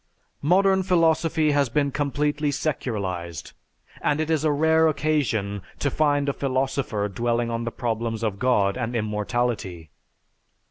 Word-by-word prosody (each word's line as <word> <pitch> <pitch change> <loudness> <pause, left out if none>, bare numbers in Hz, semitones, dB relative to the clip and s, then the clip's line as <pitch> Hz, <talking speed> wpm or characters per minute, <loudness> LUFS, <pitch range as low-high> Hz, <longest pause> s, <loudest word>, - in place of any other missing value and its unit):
Modern 190 +5 +3
philosophy 165 -3 +2
has 145 -3 +2
been 140 +3 +1
completely 145 +1 0
secularized, 100 - -3 0.5
and 145 - +1
it 155 +1 -1
is 155 -2 +1
a 155 - +3
rare 160 +2 +3
occasion 135 -10 0 0.2
to 140 - -1
find 145 -1 +1
a 140 - +1
philosopher 130 -6 -1
dwelling 120 +3 -1
on 115 0 -2
the 115 - -3
problems 115 -2 -3
of 100 -3 -2
God 115 -5 +2
and 120 0 -3
immortality. 105 - -2
130 Hz, 135 wpm, -24 LUFS, 110-150 Hz, 0.5 s, Modern